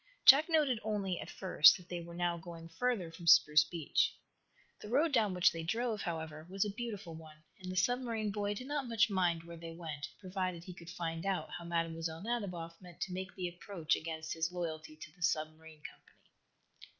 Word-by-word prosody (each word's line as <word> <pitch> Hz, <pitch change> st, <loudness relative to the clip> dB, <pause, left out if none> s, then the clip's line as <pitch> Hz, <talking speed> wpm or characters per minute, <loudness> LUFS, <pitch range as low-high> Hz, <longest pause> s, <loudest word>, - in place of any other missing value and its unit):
Jack 290 Hz, +5 st, +9 dB
noted 295 Hz, -8 st, +3 dB
only, 200 Hz, -4 st, -2 dB
at -, -, -7 dB
first, 160 Hz, -5 st, +6 dB
that 180 Hz, -, -15 dB
they 175 Hz, -1 st, -4 dB
were 170 Hz, 0 st, -9 dB
now 175 Hz, 0 st, 0 dB
going 165 Hz, 0 st, -9 dB
further 180 Hz, 0 st, -1 dB
from 170 Hz, +1 st, -10 dB
Spruce 150 Hz, -1 st, +7 dB
Beach. 165 Hz, -3 st, 0 dB, 0.7 s
The -, -, -9 dB
road 295 Hz, +7 st, +3 dB
down 215 Hz, -8 st, +2 dB
which 180 Hz, 0 st, +5 dB
they 165 Hz, -, -5 dB
drove, 225 Hz, +5 st, -1 dB
however, 160 Hz, -2 st, -5 dB
was 195 Hz, +2 st, 0 dB
a 205 Hz, -, -2 dB
beautiful 205 Hz, -6 st, -6 dB
one, 155 Hz, -1 st, -12 dB, 0.2 s
and 185 Hz, 0 st, -5 dB
the -, -, -5 dB
submarine 230 Hz, +1 st, 0 dB
boy 205 Hz, 0 st, -1 dB
did 250 Hz, -, -6 dB
not 285 Hz, -1 st, -2 dB
much 230 Hz, -1 st, +3 dB
mind 175 Hz, -3 st, +1 dB
where 170 Hz, 0 st, -10 dB
they 165 Hz, 0 st, -8 dB
went, 160 Hz, -3 st, -6 dB
provided 185 Hz, -3 st, -3 dB
he 180 Hz, -, -8 dB
could 170 Hz, -1 st, -12 dB
find 165 Hz, -2 st, -4 dB
out 195 Hz, -2 st, -1 dB
how 170 Hz, -, -6 dB
Mlle. 165 Hz, 0 st, -2 dB
Nadiboff 180 Hz, -8 st, -4 dB
meant 175 Hz, -2 st, -13 dB
to 185 Hz, -, -2 dB
make 185 Hz, 0 st, -5 dB
the 185 Hz, -2 st, -2 dB
approach 175 Hz, -1 st, -1 dB
against 160 Hz, 0 st, -4 dB
his 165 Hz, +1 st, -1 dB
loyalty 160 Hz, -3 st, -5 dB
to 155 Hz, -, -10 dB
the 180 Hz, -, -24 dB
submarine 155 Hz, -1 st, -2 dB
company. -, -, -13 dB
175 Hz, 200 wpm, -34 LUFS, 165-205 Hz, 0.7 s, Jack